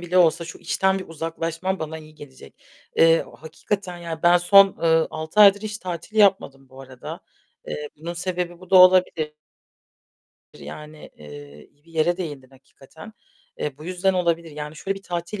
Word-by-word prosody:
bile 175 +1 0
olsa 170 -1 +3
şu 165 - -10
işten 190 0 0
bir 185 - -9
uzaklaşmam 165 +3 -4
bana 160 0 -5
iyi 155 0 -15
gelecek. 145 -3 -14 0.4
Eee, 165 0 +5
o - - -16
hakikaten 180 +3 -5
ya, 165 -2 -7
ben 175 +1 +6
son, 195 +2 +5
ııı, 165 -1 +2
6 160 +6 -2
aydır 205 0 +7
hiç 215 0 -5
tatil 180 +4 -7
yapmadım 160 -10 +2
bu 130 +1 -14
arada. 130 -2 -9 0.5
Eee, 150 0 -5
bunun 165 +3 -6
sebebi 175 0 -4
bu 185 - -15
da 190 - +6
olabilir. 180 -4 +5 1.3
Yani, 150 0 -11
eee, 75 0 -12
iyi 145 +2 -37
bir 165 - -20
yere 165 +2 +1
değindin 145 -8 -7
hakikaten. 140 +8 -16 0.5
Eee, 145 -2 -4
bu 155 - -11
yüzden 185 +2 0
olabilir. 170 -2 -1
Yani, 150 +1 -8
şöyle 195 +4 -3
bir - - -23
tatil 175 +2 -5
165 Hz, 170 wpm, -23 LUFS, 155-185 Hz, 1.3 s, aydır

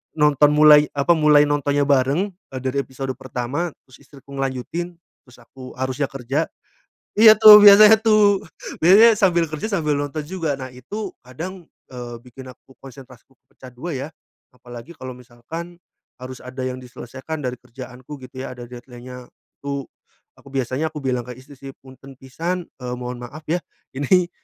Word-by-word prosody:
nonton 150 -1 +4
mulai 150 0 +7
apa 140 +4 +1
mulai 150 -2 +5
nontonnya 145 0 0
bareng, 140 +9 +1 0.2
eee, 130 - -5
dari 130 +1 -1
episode 135 0 -6
pertama 130 +7 -4
terus 130 - -19
istriku 140 0 -18
ngelanjutin, 135 +6 -4 0.3
terus 125 -2 -20
aku 130 +2 -13
harusnya 130 +2 -2
kerja, 135 +4 -2 0.7
iya 220 0 +9
tuh 215 -1 +11
biasanya 210 +2 +9
tuh, 210 -3 +3 0.4
biasanya 215 +6 +7
sambil 175 -4 +2
kerja 155 +7 -4
sambil 155 -6 0
nonton 145 +2 -4
juga. 165 -4 -3
Nah 130 - -6
itu 200 - -7
kadang, 170 +9 -8 0.3
eee, 120 -2 -8
bikin 125 +1 -13
aku 130 +1 -22
konsentrasiku 130 -1 -15 0.2
pecah 130 - -14
dua 155 +6 -6
ya. 135 +2 -5 0.5
Apalagi 120 +3 -12
kalau 130 -4 -9
misalkan, 145 +9 -10 0.4
harus 130 0 -9
ada 130 +1 -8
yang 130 0 -4
diselesaikan 130 +4 -8
dari 125 -2 -4
kerjaanku 130 +3 -11
gitu 130 +1 -9
ya - - -7
ada 125 -1 -10
deadline-nya, 125 0 -11 0.3
itu, 140 -1 -4 0.5
aku - - -20
biasanya 135 +4 -2
aku 150 - -6
bilang 125 -3 -2
ke 125 - -8
istri 135 +3 -15
sih, 135 +1 -10
"Punten 135 +1 -15
pisan," 165 +7 -5
eee, 125 0 -4
"mohon 125 0 -6
maaf 145 +6 -10
ya 170 - +1 0.4
ini 175 +5 +2
135 Hz, 160 wpm, -21 LUFS, 125-160 Hz, 0.7 s, tuh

